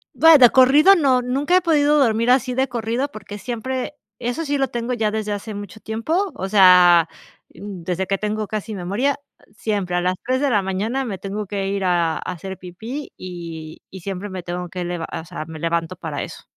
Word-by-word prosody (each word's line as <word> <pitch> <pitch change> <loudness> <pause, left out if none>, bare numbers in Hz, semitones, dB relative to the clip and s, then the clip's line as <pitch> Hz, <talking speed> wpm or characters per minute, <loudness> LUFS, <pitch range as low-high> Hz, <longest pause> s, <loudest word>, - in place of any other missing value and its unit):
Vaya, 300 -7 +8
corrido 285 +9 +6
no, 265 -8 +3
nunca 280 +8 +2
he 370 - +3
podido 300 -3 +3
dormir 230 -4 +2
así 255 0 +3
de 265 +2 +1
corrido 235 +2 -2
porque, 210 -3 -9
siempre 255 +4 -4 0.2
eso 245 +7 -3
sí 285 -1 -1
lo 270 - +2
tengo 240 +1 -3
ya 220 -3 0
desde 215 -1 -3
hace 205 +1 -5
mucho 205 +1 -8
tiempo. 315 - -1
O 190 - -4
sea, 180 -4 +6 0.4
desde 185 -1 -5
que 195 +1 -1
tengo 215 0 -2
casi 215 +1 -4
memoria, 205 +11 -1 0.2
ah, - - -26
siempre 200 -5 -2
a 175 - +1
las 180 +1 +1
03:00 260 +1 0
de 280 -2 +1
la 205 -4 +3
mañana 210 +8 -2
me 205 -6 -4
tengo 200 +2 -5
que 195 0 -3
ir 195 0 -2
a 170 -3 +1
a - - -5
hacer 185 +1 -6
pipí, 220 +11 -7
y 165 -3 -8
y 190 - -10
siempre 195 +2 -5
me 185 -2 -6
tengo 175 0 -5
que 180 0 -5
lev 175 -1 -4
o 160 - -5
sea, 155 - -7
me 160 -1 -9
levanto 165 +2 -2
para 160 -5 -5
eso. - - -8
210 Hz, 205 wpm, -21 LUFS, 180-255 Hz, 0.4 s, Vaya